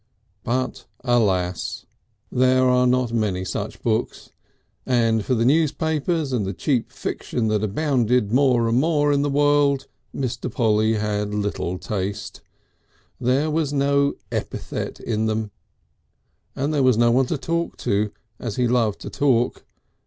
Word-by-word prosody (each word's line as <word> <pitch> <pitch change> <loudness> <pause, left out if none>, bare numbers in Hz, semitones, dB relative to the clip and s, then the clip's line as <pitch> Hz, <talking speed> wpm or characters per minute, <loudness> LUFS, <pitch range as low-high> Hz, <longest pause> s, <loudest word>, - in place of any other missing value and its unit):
But 130 +2 -2 0.2
alas! 95 -8 0 0.5
there 130 +1 +3
are 125 0 +4
not 125 -1 +1
many 100 -5 0
such - - -5
books, - - -2 0.5
and 115 -3 +2
for 130 - 0
the 115 0 +1
newspapers 155 +1 +1
and 120 -4 +1
the 95 +1 -3
cheap 125 - -1
fiction 110 -3 -3
that 110 -1 0
abounded 125 -1 +1
more 125 -2 +3
and 115 +2 +2
more 145 -1 +2
in 140 - +2
the 145 - 0
world 145 -1 +3 0.3
Mr. 125 -2 -3
Polly 110 -1 +2
had 105 -1 -2
little 100 -3 -2
taste. 95 +1 -4 0.8
There 135 +5 +1
was 150 -2 0
no 140 0 +2 0.2
epithet - - -4
in 110 -1 -1
them. 110 -1 -2 1.0
And 140 +3 -1
there 145 - +2
was 130 -4 +4
no 120 0 +4
one 130 +2 +3
to 160 - -1
talk 170 +4 -2
to, 105 +1 +1 0.3
as 115 -4 -4
he 125 -1 +1
loved 115 -4 +1
to - - -7
talk. 125 -4 +1
125 Hz, 145 wpm, -23 LUFS, 110-140 Hz, 1.0 s, are